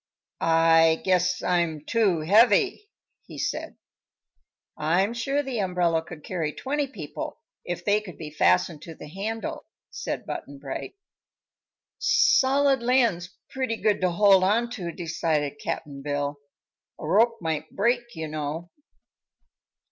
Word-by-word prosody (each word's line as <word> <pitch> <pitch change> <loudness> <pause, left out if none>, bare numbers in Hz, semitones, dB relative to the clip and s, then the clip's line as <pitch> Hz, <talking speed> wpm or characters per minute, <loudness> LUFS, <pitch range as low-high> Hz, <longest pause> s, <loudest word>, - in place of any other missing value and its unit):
"I 165 0 +4
guess 180 -1 +2
I'm 170 -4 0
too 205 -8 +2
heavy," 250 - +4 0.4
he - - -10
said. - - -3 1.0
"I'm 175 +8 +1
sure 275 +5 -1
the 260 -4 -3
umbrella 180 -4 +1
could 160 -2 -11
carry 165 -5 -3
twenty 285 +1 -2
people, 180 - -7 0.3
if 175 -1 -5
they 210 +1 +3
could 185 -5 -11
be 155 -2 -7
fastened 150 - +2
to 165 0 -9
the 150 - -10
handle," 210 +7 -5 0.2
said - - -4
Button 140 - -6
Bright. 140 - -6 1.0
"Solid 270 0 +4
land's 235 -8 +1
pretty 255 -4 -2
good 210 -3 +1
to 185 - +3
hold 195 +1 +5
on 230 +5 +2
to," 180 -8 -4
decided 160 -4 -2
Cap'n 140 -2 -4
Bill. 145 0 -2 0.6
"A - - -6
rope 230 +7 +3
might 160 -2 -3
break, 235 +3 0
you 160 -1 -4
know." 155 +3 -5
180 Hz, 130 wpm, -26 LUFS, 160-230 Hz, 1.0 s, hold